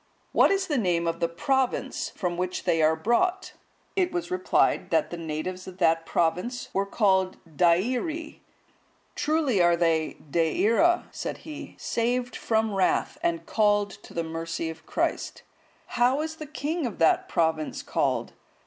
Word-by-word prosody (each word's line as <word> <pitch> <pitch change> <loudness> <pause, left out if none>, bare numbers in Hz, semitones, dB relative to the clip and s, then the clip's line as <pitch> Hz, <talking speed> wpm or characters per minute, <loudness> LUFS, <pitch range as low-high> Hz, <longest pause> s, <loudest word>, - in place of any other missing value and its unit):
What - - +5
is 390 -1 +1
the 295 -7 0
name 175 -5 +1
of 165 0 -1
the 170 - +2
province 265 +9 -1
from 180 -2 -2
which 180 +1 -3
they 165 - +2
are 155 +1 +4
brought?" 360 - 0 0.4
It 370 -2 +1
was 350 0 -3
replied, 365 0 +2
that 310 - +1
the - - -3
natives 165 +3 -4
of 185 -1 -9
that 165 -2 +2
province 180 +10 -1
were 195 +1 0
called 190 -3 +2
Deiri.(159) 240 - 0 0.7
"Truly 295 - +1
are 175 0 +5
they 165 -2 +1
De 165 +4 +1
ira," 345 +10 +3
said - - -5
he, 305 -2 -8
"saved 245 +1 -1
from 220 -1 0
wrath, 195 +9 +1
and 340 -1 -1
called 205 -2 +2
to - - -14
the 170 - 0
mercy 165 0 -4
of 160 0 -14
Christ. - - -2 0.4
How 255 +4 +2
is 315 0 -4
the 310 - -7
king 305 +1 -2
of 225 - -7
that 165 - +3
province 160 -2 0
called?" - - -1
200 Hz, 155 wpm, -26 LUFS, -, 0.7 s, What